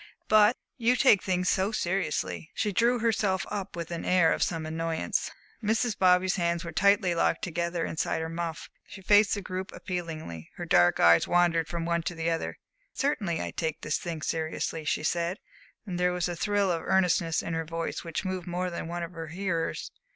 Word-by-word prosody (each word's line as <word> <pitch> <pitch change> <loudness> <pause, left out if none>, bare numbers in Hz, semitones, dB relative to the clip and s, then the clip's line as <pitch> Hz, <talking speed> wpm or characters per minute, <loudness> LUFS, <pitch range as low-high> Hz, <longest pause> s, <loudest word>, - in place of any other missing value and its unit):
But 215 +2 +5 0.2
you 240 +2 +3
take 235 -6 +5
things 180 -1 0
so 190 +3 +2
seriously!" 190 -4 -2
She 210 - 0
drew 235 +5 +3
herself 215 -5 +1
up 200 -4 -4
with 170 -1 -5
an 170 - -4
air 175 -3 +4
of - - -3
some 165 -2 0
annoyance. 160 +1 -2 0.3
Mrs. 220 +1 +1
Bobby's 185 0 +3
hands 170 0 0
were 170 - -5
tightly 200 +1 +3
locked 165 -1 +1
together 170 0 -2
inside 160 - -1
her 160 - -3
muff, 165 -1 -4 0.2
she 195 - -11
faced 205 +2 +5
the 200 - -5
group 185 +1 -5
appealingly, 160 - -6
her - - -5
dark 90 0 +4
eyes 85 0 +6
wandering 175 -2 +3
from 170 0 -4
one 170 0 +1
to 175 +1 -4
the 165 0 -1
other. 165 - -3 0.4
"Certainly, 205 - 0
I - - -4
take 160 -2 -3
this 150 - -1
thing 165 -3 -5
seriously," 160 0 -2
she 150 - 0
said, 170 +3 0 0.5
and 180 -4 -4
there 180 0 +2
was 180 -1 0
a 175 - -3
thrill 200 +1 +1
of 165 -1 -1
earnestness 180 -3 +2
in 165 - -4
her 165 0 -1
voice 165 +1 -4
which 165 +3 -4
moved 185 -2 -3
more 180 +1 -2
than 170 - -5
one 175 +1 -4
of 170 - -6
her 165 -2 -7
hearers. 175 0 -3
175 Hz, 195 wpm, -28 LUFS, 165-190 Hz, 0.5 s, eyes